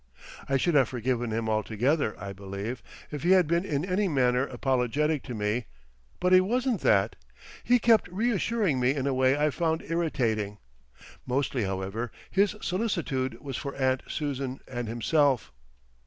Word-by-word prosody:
I 135 - +3
should 170 +6 +1
have 135 -5 +4
forgiven 120 -1 -1
him 110 0 -2
altogether, 110 +5 0
I 100 +1 -6
believe, 100 +4 -6 0.3
if 150 -2 -5
he 180 +3 +4
had 185 -2 +5
been 170 +3 +1
in 150 -4 -1
any 190 +2 +1
manner 130 -4 +2
apologetic 135 +4 0
to 125 - -5
me; 105 +3 -1 0.5
but 180 +1 +2
he 185 - +8
wasn't 240 +2 0
that. 100 +1 +3 0.5
He 245 +1 +4
kept 230 -2 +4
reassuring 205 - 0
me 125 +3 +2
in 135 -2 -2
a 140 - +1
way 130 +1 +3
I 150 +1 +2
found 160 +1 -1
irritating. 115 -11 -1 0.7
Mostly, 130 -3 0
however, 95 +5 -3 0.2
his 200 +1 +2
solicitude 160 - -1
was 135 -4 -5
for 140 -2 -5
Aunt 130 -1 +1
Susan 135 -3 -3
and 120 -2 -4
himself. 125 - +1
135 Hz, 155 wpm, -28 LUFS, 120-170 Hz, 0.7 s, he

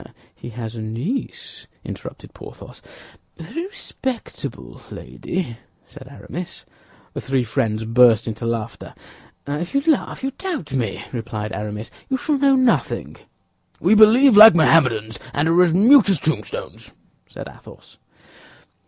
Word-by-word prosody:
"Ah, - - -17 0.2
he - - -10
has 115 -1 -7
a 115 - -6
niece!" 120 - -5 0.2
interrupted - - -9
Porthos. - - -13 0.6
"A - - -9
very 335 +3 -6
respectable 260 - -7
lady," 125 -12 -6 0.3
said 135 -3 -14
Aramis. 170 +5 -8 0.5
The - - -5
three 135 -2 -1
friends 110 -2 -2
burst 115 -1 +4
into 115 +1 -4
laughter. 115 -1 -5 0.5
"Ah, 145 +1 -3
if 175 - -6
you 275 - +3
laugh, 315 -4 +1
if - - -16
you 270 - -1
doubt 310 - -6
me," 115 -7 -2
replied 110 -2 -5
Aramis, 105 +2 -6 0.2
"you 265 - 0
shall 285 +2 -1
know 275 -1 +4
nothing." 255 -2 0 0.6
"We - - +3
believe 220 +4 +6
like 215 -1 +10
Mohammedans, 125 -9 +2 0.2
and 145 +2 +1
are 170 +2 +4
as 180 -2 +4
mute 220 - +6
as 190 -6 +2
tombstones," 470 - -5 0.3
said - - -9
Athos. - - -16
150 Hz, 145 wpm, -20 LUFS, -, 0.6 s, like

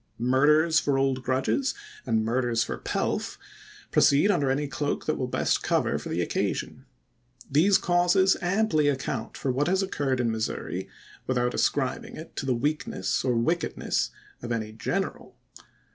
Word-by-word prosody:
Murders 150 +6 +4
for 140 -2 0
old 135 -1 +1
grudges, 130 - 0 0.3
and 110 -2 +1
murders 120 0 +1
for - - -5
pelf, - - -2 0.5
proceed 145 +9 +4
under 145 -8 +1
any 145 +2 0
cloak 140 +3 -2
that 155 - 0
will 130 - -2
best - - 0
cover - - +1
for - - -7
the - - 0
occasion. 130 - -3 0.7
These 180 +8 +5
causes 180 +2 +3
amply 180 -4 +2
account 135 -4 -2
for 135 - -1
what 140 +4 0
has 190 +2 +2
occurred 140 -8 -1
in 120 -2 +1
Missouri, 110 -1 -3 0.4
without 125 -1 0
ascribing 130 -3 -1
it 160 - -10
to 135 - -3
the 130 - +2
weakness 140 -7 -1
or 125 -2 +1
wickedness 160 +9 0 0.3
of 120 - -5
any 110 -2 -2
general. 110 0 -4
135 Hz, 150 wpm, -26 LUFS, 125-155 Hz, 0.7 s, These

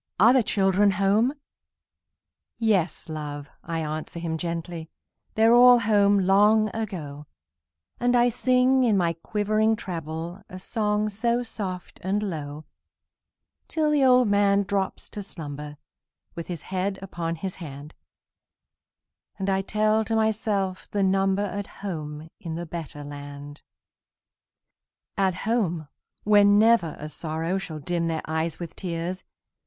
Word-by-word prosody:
are 225 +6 +7
the 260 - +5
children 200 -1 +3
home?" 200 +6 +2 1.3
"Yes, 205 -7 +1
love!" 150 -2 -6
I 165 -1 -3
answer 155 +2 -5
him 165 -1 -3
gently, 170 0 -4 0.5
"They're 225 +1 +5
all 245 0 +8
home 205 -3 +3
long 205 +3 +4
ago;" 155 -10 -5 0.7
And 245 0 +2
I 245 0 +5
sing, 255 +2 +3
in 220 -5 +3
my 170 -2 +2
quivering 215 +5 +1
treble, 165 -1 -6
A 185 - -8
song 210 +1 -1
so 235 +4 0
soft 190 -6 -6
and 200 +3 -1
low, 155 -5 -5 1.0
Till 310 -2 0
the 290 -2 +3
old 250 -2 +5
man 200 0 +3
drops 195 0 -2
to 205 - -5
slumber, 150 -6 -8 0.6
With 170 -1 -7
his 170 -4 -6
head 190 +1 -2
upon 170 -3 -3
his 185 +3 -5
hand, 145 -1 -8 1.4
And 195 0 -1
I 190 0 +1
tell 215 +2 +1
to 225 - -1
myself 210 -4 0
the 200 -1 0
number 195 +1 +2
At 200 0 -4
home 155 -5 -6
in 165 -2 -5
the 170 +1 -4
better 160 -3 -7
land. 145 0 -9 1.5
At 190 -3 +1
home, 175 -10 0 0.3
where 205 -1 +6
never 205 -4 +4
a 150 - -6
sorrow 165 +4 -2
Shall 160 -5 -6
dim 170 +3 -1
their 160 -1 -2
eyes 160 +1 -2
with 170 -2 -7
tears! 175 0 -4
190 Hz, 135 wpm, -25 LUFS, 165-215 Hz, 1.5 s, all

